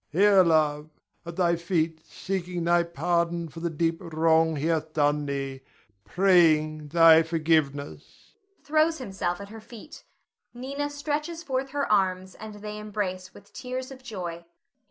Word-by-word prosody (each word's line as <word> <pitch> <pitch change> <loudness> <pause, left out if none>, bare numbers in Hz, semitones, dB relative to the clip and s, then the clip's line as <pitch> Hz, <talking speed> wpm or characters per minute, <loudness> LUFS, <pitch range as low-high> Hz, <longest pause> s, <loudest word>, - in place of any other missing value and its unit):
] - - -49
Here, 195 +4 +5
love, 155 -3 +2 0.4
at 170 - -6
thy 170 -1 +2
feet 165 -2 -1
seeking 180 -2 -4
thy 175 +1 +3
pardon 170 0 -1
for 165 - -10
the 170 +1 -2
deep 165 +1 -1
wrong 160 -1 +2
he 145 +1 -3
hath 160 -1 -1
done 145 -1 +1
thee, 135 -1 -4 0.4
praying 155 - +3
thy 165 +1 +7
forgiveness! 155 -3 -2 0.3
[Throws 315 +2 +2
himself 190 -7 -3
at 200 0 -9
her 225 +1 -10
feet. 235 +6 -13 0.5
Nina 280 +4 -4
stretches 300 +3 -4
forth 270 -2 -2
her 280 +1 -1
arms, 185 -2 +1
and 215 -1 -10
they 210 0 -7
embrace 195 -3 -4
with 200 0 -17
tears 255 +1 -6
of 260 -1 -11
joy.] 195 -9 -5
Nina. 170 - -19
175 Hz, 155 wpm, -26 LUFS, 160-210 Hz, 0.5 s, thy